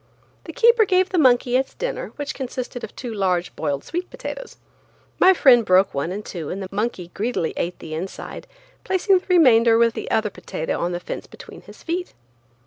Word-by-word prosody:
The -, -, -7 dB
keeper 470 Hz, -1 st, +5 dB
gave 370 Hz, -2 st, +2 dB
the 365 Hz, -, +1 dB
monkey 250 Hz, -3 st, +4 dB
its 265 Hz, +1 st, 0 dB
dinner, -, -, -4 dB
which 290 Hz, 0 st, -4 dB
consisted 255 Hz, -1 st, -6 dB
of -, -, -8 dB
two 245 Hz, -3 st, -6 dB
large 185 Hz, -4 st, -1 dB
boiled 145 Hz, -3 st, -2 dB
sweet 355 Hz, +2 st, -4 dB
potatoes. -, -, -8 dB, 0.6 s
My 375 Hz, -, +7 dB
friend 260 Hz, -10 st, +6 dB
broke 190 Hz, -1 st, +3 dB
one 140 Hz, +5 st, -2 dB
in 205 Hz, +3 st, -5 dB
two 165 Hz, -7 st, -6 dB
and 195 Hz, -, -4 dB
the 190 Hz, -, -5 dB
monkey 195 Hz, -4 st, -3 dB
greedily 215 Hz, -6 st, -2 dB
ate 175 Hz, +1 st, -3 dB
the 155 Hz, -, -9 dB
inside, 175 Hz, +5 st, -6 dB, 0.4 s
placing 375 Hz, 0 st, +2 dB
the -, -, -24 dB
remainder 240 Hz, -, +5 dB
with 230 Hz, 0 st, +3 dB
the -, -, -6 dB
other 215 Hz, -2 st, 0 dB
potato 160 Hz, -, -4 dB
on 175 Hz, -, -1 dB
the 175 Hz, -, -3 dB
fence -, -, -7 dB
between -, -, -13 dB
his -, -, -15 dB
feet. 355 Hz, +2 st, -4 dB
240 Hz, 195 wpm, -22 LUFS, -, 0.6 s, My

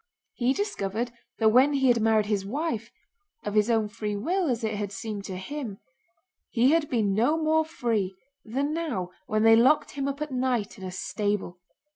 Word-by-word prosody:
He 250 Hz, +2 st, +1 dB
discovered 240 Hz, -, -2 dB, 0.3 s
that 220 Hz, -1 st, +4 dB
when 260 Hz, +6 st, +5 dB
he 270 Hz, -1 st, +2 dB
had 235 Hz, -2 st, +3 dB
married 220 Hz, -1 st, +3 dB
his 205 Hz, -2 st, 0 dB
wife—of 280 Hz, -, -6 dB
his 210 Hz, +1 st, +3 dB
own 225 Hz, -2 st, +2 dB
free 210 Hz, 0 st, -4 dB
will 340 Hz, -, 0 dB
as 235 Hz, -2 st, -1 dB
it 220 Hz, 0 st, 0 dB
had 205 Hz, -1 st, -3 dB
seemed 205 Hz, 0 st, -5 dB
to 190 Hz, -, -5 dB
him—he 230 Hz, +2 st, -4 dB
had 320 Hz, -2 st, +2 dB
been 215 Hz, -5 st, +1 dB
no 240 Hz, +10 st, +2 dB
more 315 Hz, 0 st, +2 dB
free 230 Hz, -, -1 dB, 0.3 s
than 275 Hz, +6 st, -2 dB
now 260 Hz, -, -2 dB, 0.2 s
when 215 Hz, 0 st, +1 dB
they 225 Hz, 0 st, +8 dB
locked 255 Hz, +7 st, +4 dB
him 275 Hz, -1 st, -3 dB
up 280 Hz, +1 st, -3 dB
at 300 Hz, -1 st, -4 dB
night 250 Hz, -5 st, -1 dB
in -, -, -10 dB
a 185 Hz, -, -4 dB
stable. 205 Hz, -2 st, -2 dB
230 Hz, 180 wpm, -27 LUFS, 210-280 Hz, 0.3 s, they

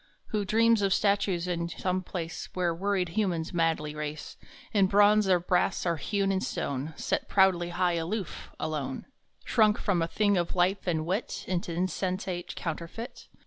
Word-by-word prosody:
Who 210 Hz, -2 st, -1 dB
dreams 225 Hz, +2 st, +4 dB
of 195 Hz, -1 st, +3 dB
statues 200 Hz, -4 st, +1 dB
in 170 Hz, -1 st, -1 dB
some 185 Hz, +2 st, -1 dB
place 175 Hz, -2 st, -5 dB
Where 180 Hz, -2 st, +1 dB
worried 190 Hz, 0 st, 0 dB
humans 175 Hz, -4 st, -1 dB
madly 165 Hz, -3 st, 0 dB
race, 150 Hz, 0 st, -5 dB, 0.4 s
In 200 Hz, -3 st, +4 dB
bronze 205 Hz, +1 st, +5 dB
or 180 Hz, -1 st, +5 dB
brass, 180 Hz, +1 st, +1 dB
or 170 Hz, -2 st, +1 dB
hewn 195 Hz, +5 st, 0 dB
in 190 Hz, -1 st, 0 dB
stone, 140 Hz, -1 st, -3 dB
Set -, -, -2 dB
proudly 185 Hz, -3 st, +3 dB
high, 175 Hz, -1 st, +1 dB
aloof, 185 Hz, +2 st, -4 dB
alone 140 Hz, -4 st, -3 dB, 0.4 s
Shrunk 215 Hz, -2 st, +4 dB
from 185 Hz, -5 st, 0 dB
a 165 Hz, -, +1 dB
thing 205 Hz, +2 st, +2 dB
of 175 Hz, 0 st, -1 dB
life 185 Hz, +2 st, +1 dB
and 160 Hz, -3 st, 0 dB
wit 190 Hz, +7 st, -2 dB
Into 175 Hz, -2 st, -2 dB
insensate 180 Hz, +1 st, -2 dB
counterfeit? 170 Hz, +8 st, -6 dB
180 Hz, 160 wpm, -28 LUFS, 170-200 Hz, 0.4 s, bronze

